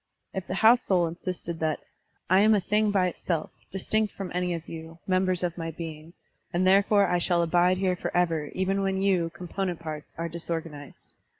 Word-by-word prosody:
If 190 -1 -4
the 185 - -3
house 230 +4 +6
soul 180 -3 +2
insisted 170 0 -4
that 155 -1 0 0.5
"I 185 +2 +5
am 215 +2 +6
a - - +3
thing 210 +3 +1
by 195 -3 +3
itself, 170 -2 -3 0.2
distinct 210 +3 0
from 195 -2 -5
any 180 -1 0
of 165 -1 -8
you, 165 0 -8
members 185 -1 +1
of 175 0 -2
my 165 0 -3
being, 160 0 -8 0.4
and 175 +2 +1
therefore 200 +2 +5
I 180 0 +1
shall 175 0 +2
abide 175 +2 +3
here 185 -1 +1
forever 165 -4 0
even 195 +1 0
when 195 0 0
you, 180 -4 +2
component 180 +1 -4
parts, 155 -2 -7
are 165 +1 -2
disorganized. 165 -3 -6
180 Hz, 185 wpm, -27 LUFS, 165-190 Hz, 0.5 s, house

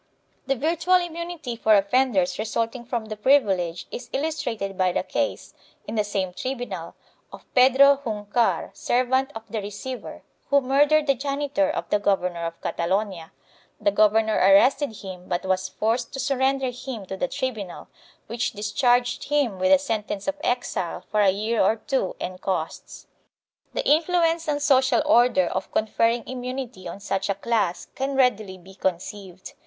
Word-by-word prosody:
The 270 - +2
virtual 330 +6 +1
immunity 340 -6 -2
for 220 -1 +4
offenders 200 -3 +2
resulting 230 +2 -2
from 235 -2 -3
the 215 0 -6
privilege 195 -9 +2
is 245 0 -7
illustrated 265 -10 -2
by 185 -1 +2
the - - -1
case, - - -3 0.3
in 215 - -5
the 215 -2 +1
same 195 -3 -2
tribunal, 220 -8 -5 0.4
of - - -12
Pedro 270 +2 +6
Juncar, 220 +1 0
servant 260 +2 +1
of 225 - -7
the 220 -2 -2
receiver, 210 +5 -7 0.3
who 280 -1 +5
murdered 290 +3 +3
the 275 - +4
janitor 285 +2 -1
of 305 - -3
the 210 - +3
Governor 180 -4 0
of 165 0 -8
Catalonia; 185 -1 -2 0.5
the 205 - +2
governor 215 +1 +3
arrested 220 +5 +4
him 185 -2 -9
but 175 +1 -2
was 185 0 0
forced 230 +3 -1
to 270 - -5
surrender 265 0 +1
him 245 -4 -7
to 190 - -5
the 270 - -1
tribunal, 220 -10 -5 0.4
which 235 +2 -2
discharged 245 +4 +1
him 275 -10 0
with 185 0 +2
a 285 - +8
sentence 215 -7 -3
of 290 - +1
exile 245 -8 -2
for 210 - +2
a 200 - +5
year 215 +4 0
or 205 +3 +3
two 225 -3 -2
and 185 0 -6
costs.4 165 -4 -7
The - - -1
influence 330 +1 +2
on 290 -1 0
social 260 -4 +3
order 235 -6 +4
of - - -4
conferring 230 +2 +1
immunity 250 -6 -6
on 170 +3 -7
such 195 -1 -2
a 200 - +1
class 200 -4 -1
can 275 +1 -2
readily 215 -7 +1
be 185 +2 -15
conceived. 185 0 -5
230 Hz, 160 wpm, -24 LUFS, 195-265 Hz, 0.5 s, a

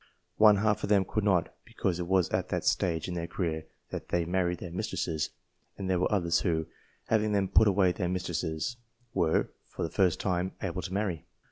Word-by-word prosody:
One 105 -1 +7
half 105 +1 +1
of - - -3
them 100 -2 +4
could 110 +3 -1
not, 95 -5 +2
because 90 -2 -2
it 85 - -3
was 95 -2 +3
at - - -1
that - - -2
stage 85 -2 +1
in 90 - -4
their 85 -1 -3
career 80 -3 -3 0.2
that - - -6
they 85 -1 +1
married 90 0 0
their 85 0 -7
mistresses; 80 -3 -2 0.5
and 95 - -4
there 95 -1 +2
were 90 - +1
others 90 -4 +2
who, 80 -4 0 0.4
having 110 -1 +2
then 100 -1 +2
put 105 +3 +5
away 95 -2 +4
their 90 0 -2
mistresses, 90 +4 -2 0.4
were, 85 -4 +2 0.2
for - - -5
the 80 - -2
first 95 -4 +2
time, 95 -1 -1
able 95 0 -2
to 95 - -6
marry. 95 -5 -2
90 Hz, 205 wpm, -29 LUFS, 85-100 Hz, 0.5 s, One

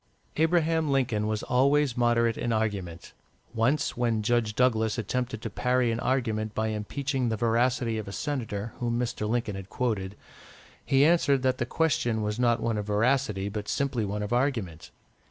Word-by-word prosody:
Abraham 160 -1 +2
Lincoln 125 -6 +1
was 110 -1 -2
always 140 +1 +2
moderate 120 -2 +2
in 120 - -2
argument. 100 -6 -3 0.4
Once, 130 +6 +1
when 115 -3 0
Judge 115 -1 +1
Douglas 110 -3 +2
attempted 115 0 -3
to 115 - -3
parry 125 +1 +1
an 115 - -2
argument 110 -5 -1
by 110 0 0
impeaching 130 +4 -2
the 110 - -1
veracity 120 0 +1
of 110 - -7
a - - -6
senator 115 -5 -4
whom 120 -1 -1
Mr. 115 -3 -2
Lincoln 115 -3 -1
had 95 0 -8
quoted, 105 -6 -2 0.7
he 135 +1 +4
answered 145 -5 +3
that 130 -1 +1
the 120 - -1
question 120 -9 0
was 105 +2 -2
not 120 -1 +3
one 115 -2 -1
of 105 - -5
veracity, 105 -1 +1
but 105 0 -5
simply 135 -5 -1
one 105 +1 -3
of 105 +3 -3
argument. 115 - -1
115 Hz, 170 wpm, -27 LUFS, 105-130 Hz, 0.7 s, he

